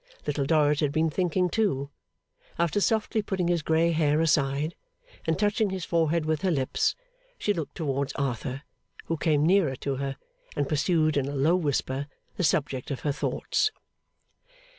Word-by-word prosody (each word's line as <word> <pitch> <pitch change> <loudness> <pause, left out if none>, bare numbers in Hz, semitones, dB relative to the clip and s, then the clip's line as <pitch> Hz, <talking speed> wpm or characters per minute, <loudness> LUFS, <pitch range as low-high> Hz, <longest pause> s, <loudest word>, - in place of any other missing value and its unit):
Little 145 -1 -1
Dorrit 150 -1 +3
had 150 -3 +1
been 160 +1 +1
thinking 180 +1 +1
too. 170 -9 0 0.7
After 170 +4 +1
softly 220 +1 +1
putting 190 -4 -1
his 175 -2 +2
grey 160 +2 +2
hair 155 -2 +2
aside, 150 -1 +1 0.5
and 160 - +2
touching 210 +1 +1
his 185 -2 -4
forehead 165 -1 +1
with 155 -1 0
her 190 - +1
lips, 135 -6 +1 0.4
she 205 - +1
looked 165 -6 -5
towards 140 -3 -1
Arthur, 135 0 -3 0.4
who 165 - -1
came 150 -2 +2
nearer 170 -6 +3
to 135 +1 -3
her, 135 0 -3 0.4
and 145 -1 0
pursued 155 0 +2
in 135 -1 +1
a 145 - -4
low 150 +6 +3
whisper 145 -4 -1 0.3
the - - -2
subject 140 -4 0
of 140 - -4
her 145 - 0
thoughts. 420 - 0
155 Hz, 160 wpm, -27 LUFS, 140-175 Hz, 0.7 s, Dorrit